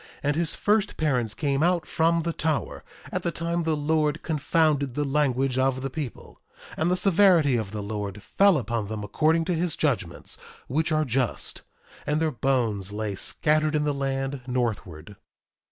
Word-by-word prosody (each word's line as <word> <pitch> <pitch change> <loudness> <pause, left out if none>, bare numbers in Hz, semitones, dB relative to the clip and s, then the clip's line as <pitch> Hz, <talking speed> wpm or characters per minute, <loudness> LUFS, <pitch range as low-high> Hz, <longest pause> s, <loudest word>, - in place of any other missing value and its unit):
And 145 0 +1
his 165 0 0
first 210 0 +1
parents 125 -8 0
came 140 -2 0
out 175 0 +2
from 165 +1 +1
the 170 0 -2
tower, 155 -3 -2 0.3
at - - -1
the - - -1
time 170 +1 -2
the 160 -2 0
Lord 150 +1 0
confounded 150 -3 +1
the 150 - 0
language 135 -2 +1
of 130 0 +1
the 135 - -3
people; 140 -4 -7 0.3
and 160 - +1
the 180 - +2
severity 180 -7 +4
of 110 -4 -2
the 105 0 -5
Lord 105 -1 -5
fell 200 -4 +4
upon 115 -4 -2
them 105 0 -5
according 160 +10 +2
to 180 - 0
his 170 -1 -1
judgments, 110 - -1 0.3
which 160 +5 0
are 155 0 +2
just; 125 -2 -1 0.5
and 150 +1 +1
their 160 -1 +1
bones 115 -6 0
lay 105 0 -3
scattered 155 +9 +1
in 150 - +2
the 150 -1 0
land 135 -1 -2
northward. 105 -8 -3
145 Hz, 170 wpm, -26 LUFS, 120-160 Hz, 0.5 s, severity